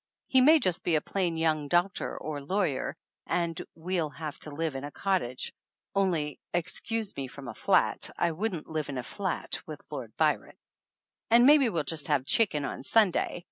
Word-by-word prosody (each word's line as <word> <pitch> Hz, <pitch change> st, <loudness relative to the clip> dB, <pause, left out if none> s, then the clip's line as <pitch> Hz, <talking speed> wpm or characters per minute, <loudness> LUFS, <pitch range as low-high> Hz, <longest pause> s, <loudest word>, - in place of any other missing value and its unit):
He 260 Hz, -, +4 dB
may 295 Hz, +5 st, +8 dB
be -, -, +5 dB
just 180 Hz, -3 st, +1 dB
a 160 Hz, -3 st, +4 dB
plain 175 Hz, 0 st, -1 dB
young 155 Hz, -2 st, +1 dB
doctor 175 Hz, +5 st, +1 dB
or 150 Hz, -2 st, -5 dB
lawyer, 160 Hz, -2 st, -1 dB, 0.3 s
and 170 Hz, -2 st, -1 dB
we'll 165 Hz, -1 st, -1 dB
have 150 Hz, -1 st, -7 dB
to -, -, -6 dB
live 155 Hz, +1 st, -2 dB
in 135 Hz, -, -4 dB
a 145 Hz, -, -4 dB
cottage 145 Hz, -4 st, -2 dB, 0.4 s
(only 170 Hz, -7 st, 0 dB, 0.2 s
excuse 210 Hz, +5 st, -1 dB
me 135 Hz, -1 st, -4 dB
from 135 Hz, +1 st, -10 dB
a -, -, -5 dB
flat, -, -, +2 dB
I 170 Hz, -, +2 dB
wouldn't 180 Hz, -1 st, -3 dB
live 155 Hz, -2 st, -3 dB
in 135 Hz, -, -4 dB
a 125 Hz, -, -3 dB
flat 195 Hz, -, -3 dB
with -, -, -7 dB
Lord -, -, -7 dB
Byron) -, -, +1 dB, 0.7 s
and 235 Hz, +2 st, +7 dB
maybe 285 Hz, -3 st, +7 dB
we'll 165 Hz, -7 st, -1 dB
just 150 Hz, 0 st, -2 dB
have 145 Hz, -4 st, +1 dB
chicken 155 Hz, -5 st, +2 dB
on -, -, -5 dB
Sunday. 180 Hz, +5 st, +2 dB
165 Hz, 180 wpm, -29 LUFS, 150-195 Hz, 0.7 s, may